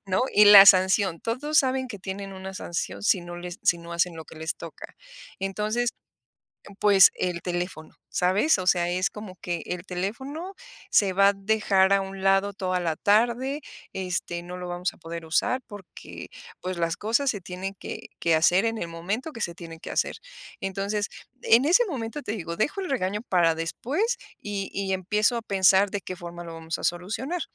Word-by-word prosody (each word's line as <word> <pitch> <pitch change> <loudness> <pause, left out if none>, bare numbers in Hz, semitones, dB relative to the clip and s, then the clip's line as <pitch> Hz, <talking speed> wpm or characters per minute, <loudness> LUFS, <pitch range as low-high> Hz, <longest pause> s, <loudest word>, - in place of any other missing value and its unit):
¿no? 185 +3 +1
Y 210 - +7
la 205 -1 +11
sanción, 190 -2 +5
todos 285 +6 0
saben 260 -1 +1
que 205 -5 -7
tienen 195 +1 -6
una 190 0 -8
sanción 175 +1 -4
si 195 -3 +3
no 175 0 -8
les 175 0 -7
si 170 - +4
no 170 0 -9
hacen 170 0 0
lo 160 -1 -8
que - - -14
les 160 +1 -3
toca. - - -10 0.5
Entonces, 215 +5 -1 0.9
pues, 200 -3 +7
el 175 -2 -2
teléfono, 175 -3 -4
¿sabes? 190 - +2
O 180 - -4
sea, 175 -2 +3
es 185 +4 0
como 210 -3 -9
que 175 -1 -3
el 180 -1 -4
teléfono 265 - -5 0.4
se 200 -2 +4
va 195 +2 +5
a - - +1
dejar 195 -1 +2
a 195 0 +4
un 195 0 -7
lado 195 +1 +2
toda 185 -1 -1
la 165 -3 -1
tarde, 240 +7 +2 0.3
este, 175 -2 -3
no 180 +1 -8
lo 180 0 -6
vamos 175 +1 -2
a - - -21
poder 165 0 -7
usar 205 +10 +1
porque, 205 -4 -11 0.3
pues, 185 -1 -4
las 165 0 -1
cosas 235 +6 +1
se 205 - -6
tienen 185 +2 -6
que - - -8
que 165 -1 +3
hacer 180 +6 +4
en 225 0 -1
el 170 - -4
momento 200 - -4
que 230 - -9
se 170 - -2
tienen 165 -2 -10
que - - -9
hacer. - - -1 0.4
Entonces, 200 +1 -2 0.3
en 235 +5 +5
ese 365 +10 +5
momento, 260 -2 -4
te 210 - -4
digo, 170 -6 -5
dejo 295 - 0
el 370 - -4
regaño 210 -4 -1
para 170 -3 +3
después 275 - -1 0.2
y 200 -2 -4
y 195 -1 -2
empiezo 210 +5 +1
a - - -3
pensar 195 -1 +4
de 200 0 -4
qué 185 - -6
forma 175 -1 -8
lo 165 - -8
vamos 165 0 -5
a - - -10
solucionar. 225 - -2
190 Hz, 195 wpm, -26 LUFS, 175-215 Hz, 0.9 s, la